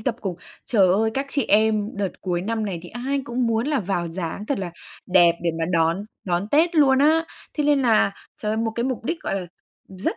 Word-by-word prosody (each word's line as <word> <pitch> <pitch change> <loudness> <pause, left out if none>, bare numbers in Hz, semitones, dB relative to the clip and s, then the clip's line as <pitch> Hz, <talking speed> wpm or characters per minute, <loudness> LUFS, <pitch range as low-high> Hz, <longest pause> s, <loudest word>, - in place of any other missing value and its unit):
tập 230 +1 -1
cùng. 190 -5 -3 0.3
Trời 205 -6 +4
ơi, 220 +4 +2
các 275 +1 -1
chị 280 -4 0
em 215 0 +3
đợt 200 -2 -3
cuối 175 -2 -1
năm 220 +1 -2
này, 180 -4 -3
thì 175 - -10
ai 270 +4 -2
cũng 245 -1 -1
muốn 230 +3 0
là 295 -5 +1
vào 175 -3 -2
dáng 180 +4 -5
thật 280 - -1
là 180 -3 -4 0.4
đẹp 175 -2 +5
để 170 - +1
mà 165 - 0
đón 165 +3 +2 0.2
đón 180 +2 -1
Tết 330 +5 +3
luôn 270 -4 +5
á. 315 +3 +4 0.3
Thế 300 - 0
nên 290 -2 +3
là, 225 -4 +3 0.2
trời 210 - -3
ơi, - - -1
một 225 0 0
cái 235 - -1
mục 255 -3 -3
đích, 330 +5 -2
gọi - - -2
là, 180 - -7 0.4
rất 190 0 -3
220 Hz, 235 wpm, -23 LUFS, 185-265 Hz, 0.4 s, đẹp